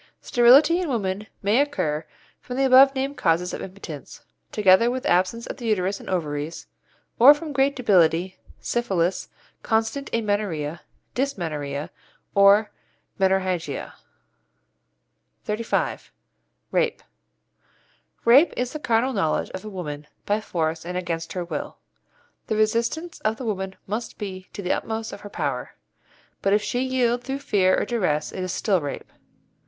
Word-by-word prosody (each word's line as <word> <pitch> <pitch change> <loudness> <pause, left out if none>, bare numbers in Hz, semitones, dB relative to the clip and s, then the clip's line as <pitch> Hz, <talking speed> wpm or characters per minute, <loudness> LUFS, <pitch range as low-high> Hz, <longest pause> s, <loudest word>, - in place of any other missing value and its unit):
Sterility 275 +8 +5
in 350 - -2
women 205 -4 -2 0.2
may 210 +7 +4
occur 160 - -1 0.3
from 250 - -7
the 270 - +3
above 270 +1 +7
named 270 +2 -2
causes 170 +2 +1
of - - -5
impotence, 180 -6 -9 0.3
together 205 +2 +5
with 255 +1 -3
absence 185 +6 +1
of - - -6
the 240 - -8
uterus 200 -2 0
and - - -10
ovaries, 155 -3 -3 0.5
or 275 +5 +9
from 300 0 -7
great 275 +1 +2
debility, 185 -6 +2 0.2
syphilis, 190 -7 -1 0.3
constant 225 +5 -1
amenorrhoea, 205 -8 -1 0.3
dysmenorrhoea, 155 - -3 0.4
or 200 +2 +5 0.5
menorrhagia. 190 -2 0 1.5
XXXV. 220 +2 -2 0.6
RAPE - - 0 1.2
Rape 265 +8 +6
is 250 0 -2
the 305 - -4
carnal 250 0 +1
knowledge 190 -8 0
of 190 - -7
a 215 - -7
woman 150 -6 -6 0.2
by 210 +1 0
force 160 -5 -2
and 180 +1 -4
against 165 -2 -3
her 180 -2 -3
will. 170 - -5 0.7
The 220 - 0
resistance 235 +10 0
of 215 +1 -1
the 255 - -6
woman 190 -3 -3
must 215 +4 -4
be 185 -3 -7
to 200 - -6
the 180 - -1
utmost 225 0 -4
of - - -9
her 205 - -9
power, - - -3 0.7
but 195 - +2
if 210 0 +3
she 245 - -1
yield 250 -2 +1
through 270 +1 -3
fear 200 -9 +2
or - - -1
duress 180 -11 -1
it 185 - -5
is 185 -1 -2
still 190 -2 +1
rape. 145 -1 -6
205 Hz, 145 wpm, -24 LUFS, 180-245 Hz, 1.5 s, or